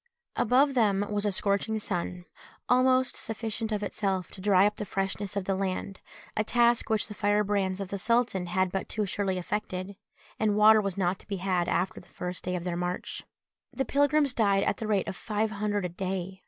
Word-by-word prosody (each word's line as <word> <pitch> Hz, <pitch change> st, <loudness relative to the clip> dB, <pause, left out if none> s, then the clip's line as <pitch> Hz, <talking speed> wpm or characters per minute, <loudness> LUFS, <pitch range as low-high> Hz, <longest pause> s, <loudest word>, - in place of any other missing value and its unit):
Above 270 Hz, +5 st, +3 dB
them 205 Hz, -5 st, +2 dB
was 205 Hz, 0 st, +1 dB
a -, -, +1 dB
scorching 200 Hz, +3 st, 0 dB
sun, 180 Hz, -3 st, -3 dB, 0.4 s
almost 255 Hz, 0 st, +3 dB
sufficient 225 Hz, 0 st, -4 dB
of 210 Hz, -1 st, -1 dB
itself 195 Hz, -3 st, -2 dB
to 190 Hz, -, -10 dB
dry 195 Hz, -1 st, +5 dB
up 210 Hz, 0 st, 0 dB
the -, -, -3 dB
freshness 195 Hz, 0 st, -3 dB
of 200 Hz, -, -1 dB
the 195 Hz, -, +1 dB
land, 190 Hz, 0 st, -3 dB, 0.3 s
a 215 Hz, -, +1 dB
task 235 Hz, +1 st, +3 dB
which 220 Hz, -1 st, +2 dB
the 210 Hz, -, -8 dB
firebrands 205 Hz, -2 st, +1 dB
of 195 Hz, -2 st, -4 dB
the 200 Hz, -, -4 dB
sultan 230 Hz, -4 st, +1 dB
had 185 Hz, +1 st, +1 dB
but 195 Hz, -, -3 dB
too 215 Hz, -1 st, -1 dB
surely 195 Hz, -1 st, -1 dB
effected, 190 Hz, 0 st, -4 dB, 0.4 s
and 215 Hz, -1 st, +2 dB
water 215 Hz, +1 st, +7 dB
was 195 Hz, -2 st, -3 dB
not 185 Hz, -1 st, 0 dB
to -, -, -17 dB
be 200 Hz, -, -3 dB
had 180 Hz, -2 st, 0 dB
after 180 Hz, +3 st, 0 dB
the -, -, -17 dB
first 180 Hz, 0 st, -5 dB
day 180 Hz, 0 st, -2 dB
of 175 Hz, -, -3 dB
their 175 Hz, -1 st, -2 dB
march. 180 Hz, +1 st, -3 dB, 0.5 s
The 270 Hz, -, -2 dB
pilgrims 285 Hz, +1 st, +3 dB
died 200 Hz, -4 st, +3 dB
at -, -, 0 dB
the 220 Hz, -, -4 dB
rate 205 Hz, -3 st, +1 dB
of -, -, -4 dB
five 215 Hz, +2 st, -1 dB
hundred 205 Hz, -2 st, -1 dB
a -, -, -2 dB
day. 190 Hz, +1 st, -4 dB
200 Hz, 205 wpm, -28 LUFS, 185-220 Hz, 0.5 s, water